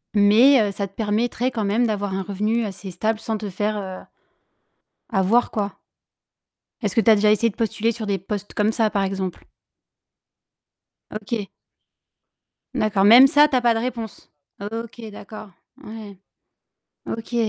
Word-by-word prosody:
mais, 215 +3 +5
heu, - - -4
ça 200 0 -4
te 195 - -28
permettrait 230 +4 -1
quand 220 -4 -2
même 225 +5 +1
d'avoir 205 -3 -2
un 195 - -2
revenu 210 +4 -1
assez 195 -1 -7
stable 215 +4 -2
sans 220 0 -3
te 210 -1 -6
faire, 210 +3 -2
heu, 190 -1 -7 1.1
avoir, 200 +6 +2
quoi? 205 -2 -3 1.1
Est-ce 205 -3 -2
que 225 - +4
tu 225 - +2
as 220 - +8
déjà 210 +1 +3
essayé 230 +2 +2
de - - -12
postuler 225 0 -1
sur 225 -1 -6
des 200 -1 -1
postes 205 +2 -6
comme 210 +1 +1
ça, 220 -2 +1
par 200 -1 -1
exemple? 190 -2 -4 1.7
OK. 215 -1 -5 1.2
D'accord, 200 -2 +1
même 240 +6 +9
ça, 295 +1 +5
tu 265 - 0
as - - +3
pas 235 -1 +3
de - - -1
réponse. 230 -2 -6 0.3
OK, 230 +3 -6
d'accord. 215 0 -11 0.3
Ouais. 210 -3 -10 0.9
OK. 225 +2 -6
215 Hz, 160 wpm, -22 LUFS, 200-230 Hz, 1.7 s, même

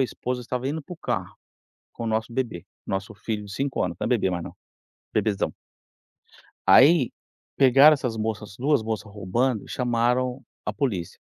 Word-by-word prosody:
a - - +5
esposa 125 0 -4
estava 125 +1 -3
indo 155 +2 -3
para 180 - -10
o 175 - -7
carro - - -3 0.6
com 115 - -6
o - - -2
nosso 110 +1 -1
bebê, 115 -9 -3 0.2
nosso 100 +2 -3
filho 105 0 -4
de 100 - -9
5 135 +5 -1
anos, 85 -2 -2
não - - -3
é - - 0
bebê 115 -6 +2
mais 85 -2 -3
não, - - -9 0.6
bebezão. 105 -3 0 1.2
Aí, 140 -2 +7 0.5
pegaram 140 +3 +7
essas 125 -5 -3
moças, 110 -2 -3
2 140 -2 +2
moças 110 -1 -4
roubando 105 +4 -1
e - - -13
chamaram 125 +1 +1 0.3
a - - 0
polícia. 105 - -2
120 Hz, 175 wpm, -25 LUFS, 105-130 Hz, 1.2 s, Aí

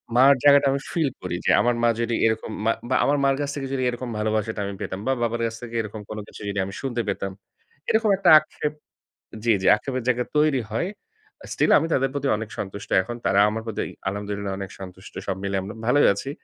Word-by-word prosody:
মার 135 +3 +7
জায়গাটা 140 -1 +6
আমি 140 - 0
ফিল 160 -5 +1
করি 90 -1 -3
যে, - - +2
আমার 120 0 +2
মা 120 - +5
যদি 115 0 0
এরকম 110 0 0
মা, 115 - +4 0.2
বা 130 - +2
আমার 145 +1 +2
মার 135 0 +3
কাছ 145 - -2
থেকে 135 -2 -4
যদি 130 - -1
এরকম 120 0 -5
ভালোবাসাটা 110 0 -1
আমি 100 - -4
পেতাম, 95 - -4
বা - - +3
বাবার 115 0 -1
কাছ 115 0 -3
থেকে 120 -1 -8
এরকম 105 0 -7
কোন 110 - -6
কিছু - - -12
যদি 100 0 -2
আমি 95 - -7
শুনতে 120 -3 -2
পেতাম। 95 -1 -3 0.6
এরকম 220 -1 +3
একটা 190 -3 +3
আক্ষেপ 150 -1 -5 0.7
জ্বী, 115 -2 +4
জ্বী 95 - 0
আক্ষেপের 130 +2 -4
জায়গা 125 -1 +2
তৈরি 150 -4 +3
হয়। 115 +11 -1 0.6
আ - - -9
স্টিল - - +2
আমি 165 - 0
তাদের 135 0 +2
প্রতি 140 -1 -2
অনেক 110 -1 -6
সন্তুষ্ট 100 0 -6
এখন। 105 +6 -6
তারা 100 - +3
আমার 110 +1 -3
প্রতি 110 - -3 0.3
আলহামদুলিল্লাহ 100 0 -3
অনেক 95 - -5
সন্তুষ্ট। 95 0 -10
সব 95 - 0
মিলে 100 0 -2
আমরা 100 +4 -7
ভালোই 145 +3 +5
আছি। 100 +7 -6
115 Hz, 220 wpm, -24 LUFS, 100-135 Hz, 0.7 s, মার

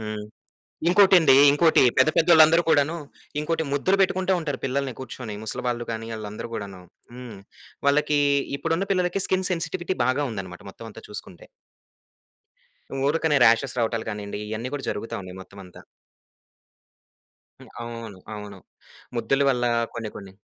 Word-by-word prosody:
హ్మ్. 105 -1 -5 0.6
ఇంకోటండి, 180 -7 +6 0.2
ఇంకోటి 160 +3 +4 0.2
పెద్ద 140 +4 +5
పెద్దోళ్ళందరు 165 0 +6
కూడాను 150 +1 +3 0.4
ఇంకోటి 160 +1 -1
ముద్దులు 185 +7 +2
బెట్టుకుంటా 185 0 +2
ఉంటారు 145 -5 -3
పిల్లల్ని 135 0 -1
కూర్చొని. 120 -4 -7
ముసలి 110 +3 -5
వాళ్ళు 120 -1 -2
గానీ, 115 0 -5
ఆళ్ళందరూ 105 +1 -7
గూడాను. 100 -4 -6 0.3
హ్మ్. 125 -4 -9 0.5
వాళ్ళకి 150 +1 +3 0.4
ఇప్పుడున్న 165 +4 -1
పిల్లలకి 180 0 0
స్కిన్ 185 0 0
సెన్సిటివిటీ 175 +1 -2
బాగా 130 +3 +1
ఉందన్నమాట 95 -4 -7
మొత్తమంతా 115 +2 -11
చూసుకుంటే. 95 -4 -10 1.6
ఊరికనే 155 0 +2
రాషెస్ 120 +3 +3
రావటాలు 115 -1 -1
కానీండి, 105 0 -6
ఇయన్నీ 110 +3 -4
కూడా 140 - -4
జరుగుతా 115 +2 -5
ఉన్నాయి 95 0 -10
మొత్తమంతా. 95 -2 -14 1.8
హ్మ్. - - -14
అవును. 115 -4 -8 0.2
అవును. 105 -2 -9 0.6
ముద్దుల 135 +5 +1
వల్ల 125 -2 -1 0.3
కొన్ని 115 -2 -5
కొన్ని 100 -2 -10
130 Hz, 125 wpm, -24 LUFS, 110-160 Hz, 1.8 s, ఇంకోటండి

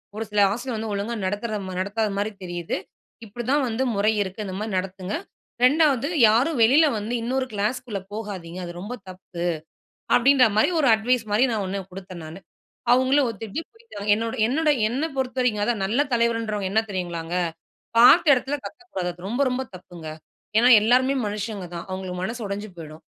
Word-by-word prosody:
ஒரு 220 - -3
சில 210 0 0
ஆசிரியர் 240 +2 -3
வந்து 220 0 -4
ஒழுங்கா 205 +4 -2
நடத்துறத 210 +2 -2
மா 185 - -6
நடத்தாத 210 +2 -1
மாதிரி 210 +2 -1
தெரியிது. 175 -1 -3 0.5
இப்டி 240 +3 -7
தான் 290 0 +3
வந்து 235 +3 -1
முறை 205 +2 +3
இருக்கு. 195 +2 -4
இந்த 185 - -5
மாரி 215 0 -4
நடத்துங்க. 190 - -3 0.5
2வது 280 0 +4 0.2
யாரும் 240 +6 +2
வெளில 280 +8 +6
வந்து 210 +3 -4
இன்னொரு 260 +2 -1
கிளாஸ்க்குள்ள 210 +1 -2
போகாதீங்க, 185 -5 -6
அது 175 - -6
ரொம்ப 220 +5 -5 0.2
தப்பு. 185 -2 -8 0.7
அப்டின்ற 260 +1 +6
மாரி, 220 - +4
ஒரு 290 - +2
அட்வைஸ் 235 +2 +1
மாரி 220 +5 +4 0.2
1 195 +1 -3
குடுத்தேன் 185 -2 -9
நானு. 160 +3 -9 0.5
அவுங்களும் 260 +2 +4
ஒத்துட்டு, 225 +5 -5
போய்ட்டாங்க. 450 - -9
என்னுடைய 225 +2 -3
என்னுடைய 300 +3 +2 0.2
என்ன 270 +6 -1
பொறுத்தவரைக்கும் 250 -5 0
அதான் 220 -3 0
நல்ல 225 +8 +1
தலைவர்ன்றவங்க 230 -4 0
என்ன 220 - +4
தெரியுங்களாங்க, 175 -2 -4 0.6
பாத்த 250 +10 +8
எடத்துல 270 +3 -1
கத்தக்கூடாது. 305 - -5
அது 175 +1 -12
ரொம்ப 245 +5 -1
ரொம்ப 250 +1 -1
தப்புங்க. 175 -3 -11 0.5
ஏன்னா 245 - +5
எல்லாருமே 255 +4 +3
மனுஷங்க 205 -2 -4
தான். 170 - -6
அவுங்களுக்கு 185 -1 -5
மனசு 225 +5 -3
உடஞ்சு 200 +2 -4
போய்டும். 155 0 -10
220 Hz, 165 wpm, -24 LUFS, 190-250 Hz, 0.7 s, பாத்த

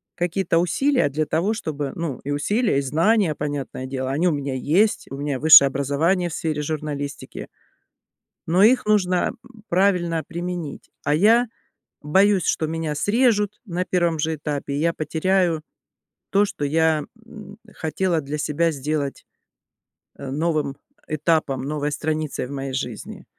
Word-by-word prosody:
какие-то 175 -1 0
усилия 250 - +2
для 155 +3 -1
того 170 +8 0
чтобы 150 -10 -4
ну, 165 -7 -4
и 145 - -4
усилия, 205 - +1
и - - 0
знания, 165 +5 +2
понятное 145 -3 -4
дело, 130 0 -3
они 155 +6 +1
у - - +1
меня 140 -3 -3
есть: 175 - +1
у 135 - -5
меня 140 -2 -2
высшее 150 -2 +9
образование 150 +7 0
в - - -7
сфере 155 -2 -2
журналистики. 145 -2 -5 1.0
Но 175 +4 +3
их 240 +3 +5
нужно 185 -4 +2 0.4
правильно 175 -3 +2
применить, 175 -3 -6
а 145 - +2
я 225 +9 +5 0.6
боюсь, 190 +4 +3
что 155 - 0
меня 160 -1 -3
срежут 210 - +1
на 180 -2 -2
1 170 -3 0
же 160 +1 0
этапе, 145 -1 -4
и - - -1
я 165 +2 +1
потеряю 165 +1 0 0.7
то, 200 +1 +4
что 170 -7 -4
я, 160 +1 +2 0.2
м, 210 -3 -12
хотела 165 +1 -1
для 145 +1 -5
себя 160 +3 +1
сделать, 145 0 -3 0.9
э, 140 - -7
новым 150 -2 -1 0.3
этапом, 155 -3 0
новой 150 +1 -2
страницей 155 -3 -2
в - - -10
моей 135 -1 -4
жизни. 125 -4 -5
160 Hz, 145 wpm, -22 LUFS, 145-180 Hz, 1.0 s, высшее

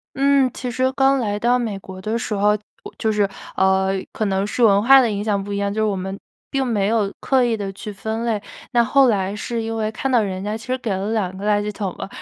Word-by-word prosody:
嗯， 275 -1 +3
其 250 - -5
实 255 +1 +1
刚 270 0 +3
来 205 -2 -1
到 240 +3 +3
美 220 -5 -2
国 190 -1 -10
的 220 +3 -1
时 215 - -3
候， 205 +1 +2 0.3
我 - - -9
就 220 -1 +1
是， 205 -2 +2 0.3
呃， 190 0 +2 0.2
可 215 - -2
能 195 -1 0
是 230 +3 +1
文 200 -2 +5
化 270 +4 +8
的 245 - +2
影 205 -1 -2
响 205 -2 0
不 200 +1 -6
一 - - -1
样， 200 0 -1
就 220 - -2
是 - - +3
我 210 - +1
们 190 +1 -4 0.3
并 270 -1 0
没 205 -5 +1
有 215 -3 +1
刻 260 -2 +2
意 235 -2 +1
地 200 -2 -4
去 210 +2 -7
分 220 +3 -4
类。 215 -3 -1 0.3
那 240 -1 +4
后 265 +3 +4
来 200 -3 0
是 230 +1 -3
因 225 0 -3
为 220 0 -1
看 270 +5 -2
到 245 -3 +4
人 190 -2 -3
家 210 +2 -2
其 225 - -10
实 255 0 0
给 235 -4 -4
了 195 +3 -2
2 190 -4 -1
个 205 - -5
垃 205 -1 +2
圾 210 - -3
桶 195 -3 -4
了， - - -6
215 Hz, 285 characters per minute, -21 LUFS, 200-235 Hz, 0.3 s, 化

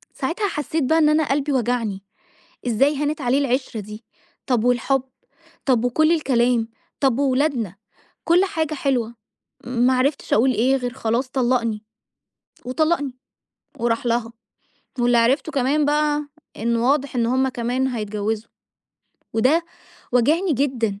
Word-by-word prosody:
ساعتها 405 +5 -1
حسّيت 305 -3 -2
بقى 320 +5 +2
إن 305 -2 +4
أنا 310 +1 +3
قلبي 285 +1 0
وجعني. 235 -6 -1 0.6
إزاي 270 +5 +2
هانت 295 +1 -2
عليه 255 +1 +2
العشرة 255 -4 -1
دي؟ 210 +3 -10 0.4
طَب 245 -4 +1
والحُب، 250 +2 +2 0.6
طَب 245 -3 +2
وكل 310 +7 +3
الكلام، 245 -6 +1 0.3
طَب 270 -2 +2
وولادنا، 260 - 0 0.5
كل 345 +3 +4
حاجة 320 -6 -2
حلوة. 245 -5 -1 0.5
ما 250 +1 +2
عرفتش 275 +3 0
أقول 255 +4 +4
إيه 255 +4 +2
غير 245 -1 -3
خلاص 245 +1 -1
طلّقني 240 -4 0 0.8
وطلّقني، 285 -1 0 0.6
وراح 235 +1 0
لها. 235 -1 0 0.7
واللي 240 0 +3
عرفته 265 +7 +2
كمان 285 +2 +1
بقى 295 0 +1 0.3
إن 235 +2 0
واضح 275 +4 +1
إن 235 -1 +2
هم 260 +2 +2
كمان 250 +2 -1
هيتجوِّزوا 215 -1 -3 0.8
وده 280 +9 +2 0.5
وجعني 310 +9 +3
جدًا. 240 -7 -1
255 Hz, 130 wpm, -22 LUFS, 235-290 Hz, 0.8 s, إن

